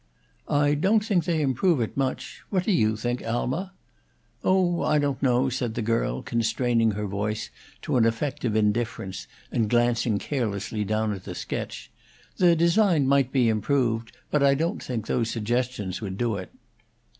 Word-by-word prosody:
"I 145 Hz, 0 st, +3 dB
don't 205 Hz, +8 st, +2 dB
think 195 Hz, -6 st, +1 dB
they 165 Hz, -3 st, +1 dB
improve 140 Hz, +4 st, +2 dB
it 115 Hz, -, -2 dB
much. 135 Hz, -1 st, -3 dB
What 185 Hz, -3 st, +1 dB
do 210 Hz, -, 0 dB
you 110 Hz, -, +2 dB
think, 120 Hz, +3 st, -2 dB
Alma?" 130 Hz, +11 st, -2 dB, 0.7 s
"Oh, 185 Hz, -2 st, +2 dB
I 150 Hz, -, +2 dB
don't 145 Hz, -2 st, 0 dB
know," 130 Hz, -1 st, +3 dB
said 120 Hz, -3 st, -3 dB
the 120 Hz, -, -2 dB
girl, 115 Hz, +1 st, 0 dB
constraining 115 Hz, -1 st, +1 dB
her 105 Hz, +1 st, -3 dB
voice 105 Hz, +2 st, -3 dB, 0.3 s
to -, -, 0 dB
an 115 Hz, -, +4 dB
effect 115 Hz, +5 st, -2 dB
of 115 Hz, -4 st, 0 dB
indifference 105 Hz, -, -1 dB, 0.2 s
and 110 Hz, -3 st, 0 dB
glancing 120 Hz, -2 st, +2 dB
carelessly 105 Hz, -4 st, -2 dB
down 110 Hz, +1 st, 0 dB
at 95 Hz, -2 st, -8 dB
the -, -, -6 dB
sketch. -, -, -5 dB, 0.5 s
"The 175 Hz, -2 st, +5 dB
design 170 Hz, -2 st, +3 dB
might 135 Hz, -1 st, +3 dB
be 125 Hz, -3 st, +3 dB
improved; 115 Hz, +1 st, 0 dB
but 150 Hz, -, +2 dB
I 140 Hz, 0 st, +5 dB
don't 165 Hz, +8 st, -1 dB
think 115 Hz, -4 st, -4 dB
those 115 Hz, -1 st, 0 dB
suggestions 115 Hz, -4 st, -2 dB
would 95 Hz, -3 st, -5 dB
do 115 Hz, -2 st, 0 dB
it." 95 Hz, -2 st, -7 dB
120 Hz, 170 wpm, -25 LUFS, 110-145 Hz, 0.7 s, The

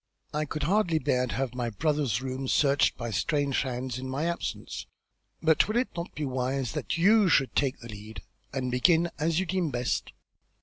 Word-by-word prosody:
I 150 Hz, +1 st, 0 dB
could 150 Hz, +1 st, -4 dB
hardly 180 Hz, -3 st, +2 dB
bear 125 Hz, -3 st, +1 dB
to -, -, -4 dB
have 130 Hz, -2 st, -1 dB
my 120 Hz, -2 st, -2 dB
brother's 130 Hz, +1 st, 0 dB
rooms 130 Hz, 0 st, -3 dB
searched 140 Hz, -1 st, +3 dB
by 120 Hz, -1 st, -4 dB
strange 145 Hz, +2 st, +1 dB
hands 125 Hz, -1 st, -3 dB
in 130 Hz, 0 st, -5 dB
my 140 Hz, +5 st, -1 dB
absence, 170 Hz, 0 st, -4 dB, 0.6 s
but 160 Hz, -1 st, +4 dB
will 215 Hz, +2 st, 0 dB
it 255 Hz, -, +1 dB
not 170 Hz, 0 st, -4 dB
be 150 Hz, -, -2 dB
wise 130 Hz, 0 st, -1 dB
that -, -, -2 dB
you 200 Hz, +3 st, +5 dB
should 135 Hz, -4 st, +3 dB
take 135 Hz, -2 st, +1 dB
the 115 Hz, -, -9 dB
lead, 105 Hz, +1 st, -9 dB, 0.3 s
and 130 Hz, -1 st, -2 dB
begin 165 Hz, +7 st, +3 dB
as 160 Hz, +2 st, +1 dB
you 190 Hz, -, 0 dB
deem 185 Hz, -3 st, 0 dB
best?" 125 Hz, -2 st, -1 dB
140 Hz, 190 wpm, -28 LUFS, 125-165 Hz, 0.6 s, you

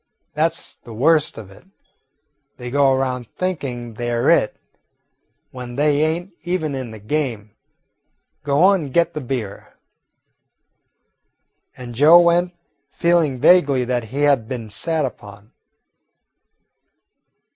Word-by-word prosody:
That 160 Hz, +2 st, +1 dB
's -, -, -6 dB
the 115 Hz, -2 st, -11 dB
worst 150 Hz, +5 st, +2 dB
of 105 Hz, -4 st, -10 dB
it. 95 Hz, -, -17 dB, 0.9 s
They 125 Hz, 0 st, -7 dB
go 140 Hz, 0 st, +3 dB
around 130 Hz, -2 st, -1 dB
thinking 130 Hz, -10 st, -4 dB
they 120 Hz, +2 st, -4 dB
're 120 Hz, 0 st, +2 dB
it, -, -, +2 dB, 0.9 s
when 125 Hz, -1 st, -8 dB
they 145 Hz, +1 st, +2 dB
ain't 170 Hz, +4 st, -2 dB
even 175 Hz, -4 st, -2 dB
in 130 Hz, -3 st, -5 dB
the 110 Hz, -, -10 dB
game. 110 Hz, -2 st, -3 dB, 0.9 s
Go 145 Hz, +3 st, +1 dB
on 190 Hz, -4 st, +4 dB
and 135 Hz, -, -9 dB
get 170 Hz, 0 st, +2 dB
the 150 Hz, -, -5 dB
beer." 120 Hz, -6 st, -6 dB, 2.0 s
And 125 Hz, -1 st, -9 dB
Joe 150 Hz, +8 st, +7 dB
went, 175 Hz, +1 st, +2 dB, 0.3 s
feeling 170 Hz, -5 st, +1 dB
vaguely 140 Hz, -4 st, +4 dB
that 120 Hz, -2 st, -2 dB
he 135 Hz, +6 st, -3 dB
had 140 Hz, -6 st, +2 dB
been 115 Hz, -4 st, -6 dB
sat 160 Hz, +7 st, 0 dB
upon. 105 Hz, -3 st, -10 dB
135 Hz, 125 wpm, -20 LUFS, 120-160 Hz, 2.0 s, Joe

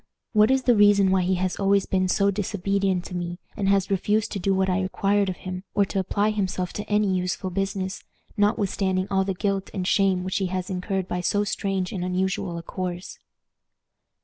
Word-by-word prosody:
What 215 Hz, 0 st, +5 dB
is 265 Hz, 0 st, +2 dB
the 245 Hz, -2 st, +4 dB
reason 205 Hz, -2 st, +5 dB
why 190 Hz, -1 st, +3 dB
he 185 Hz, +1 st, +1 dB
has 185 Hz, 0 st, -1 dB
always 200 Hz, 0 st, +2 dB
been 185 Hz, -1 st, +1 dB
so 200 Hz, +2 st, +2 dB
disobedient 195 Hz, -2 st, -1 dB
to 180 Hz, -, -7 dB
me, 175 Hz, 0 st, -4 dB, 0.2 s
and 195 Hz, -1 st, 0 dB
has 195 Hz, 0 st, +2 dB
refused 205 Hz, +3 st, +1 dB
to 200 Hz, -, -3 dB
do 195 Hz, +2 st, 0 dB
what 190 Hz, 0 st, +2 dB
I 185 Hz, +1 st, +1 dB
required 195 Hz, +1 st, +1 dB
of 185 Hz, -, -4 dB
him, 185 Hz, 0 st, -5 dB
or 200 Hz, 0 st, +4 dB
to 195 Hz, -, -2 dB
apply 205 Hz, +3 st, +1 dB
himself 190 Hz, -3 st, -2 dB
to 210 Hz, -, -4 dB
any 210 Hz, -2 st, +2 dB
useful 185 Hz, +1 st, -2 dB
business, 195 Hz, 0 st, -3 dB, 0.3 s
notwithstanding 195 Hz, -2 st, +1 dB
all 190 Hz, 0 st, +2 dB
the 195 Hz, -1 st, -2 dB
guilt 195 Hz, 0 st, -1 dB
and 185 Hz, -2 st, -2 dB
shame 190 Hz, -3 st, +2 dB
which 185 Hz, +1 st, -2 dB
he 195 Hz, -2 st, 0 dB
has 185 Hz, +1 st, -3 dB
incurred 190 Hz, 0 st, -2 dB
by 180 Hz, -1 st, -2 dB
so 205 Hz, +4 st, +1 dB
strange 195 Hz, -2 st, -2 dB
and 185 Hz, -3 st, -3 dB
unusual 180 Hz, -1 st, -1 dB
a 170 Hz, -, -6 dB
course? 180 Hz, 0 st, -5 dB
190 Hz, 200 wpm, -25 LUFS, 185-200 Hz, 0.3 s, What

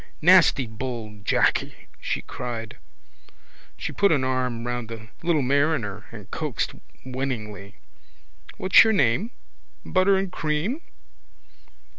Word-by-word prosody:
—Nasty 165 Hz, -5 st, +6 dB
bold 110 Hz, -3 st, -7 dB
Jacky! -, -, +1 dB
she -, -, -3 dB
cried. 115 Hz, -3 st, -6 dB, 1.0 s
She -, -, -4 dB
put 200 Hz, 0 st, +3 dB
an 140 Hz, -4 st, +2 dB
arm 125 Hz, -2 st, -1 dB
round 120 Hz, -2 st, -3 dB
the 110 Hz, -1 st, -9 dB
little 165 Hz, -4 st, +1 dB
mariner 130 Hz, -7 st, 0 dB
and -, -, -11 dB
coaxed -, -, -2 dB, 0.3 s
winningly: 110 Hz, -6 st, -5 dB, 0.8 s
—What's 185 Hz, -, +7 dB
your 220 Hz, -1 st, +2 dB
name? 140 Hz, -, +2 dB, 0.6 s
Butter 190 Hz, +1 st, +3 dB
and 190 Hz, -1 st, -2 dB
cream? 170 Hz, -, -2 dB
130 Hz, 110 wpm, -24 LUFS, 115-165 Hz, 1.0 s, What's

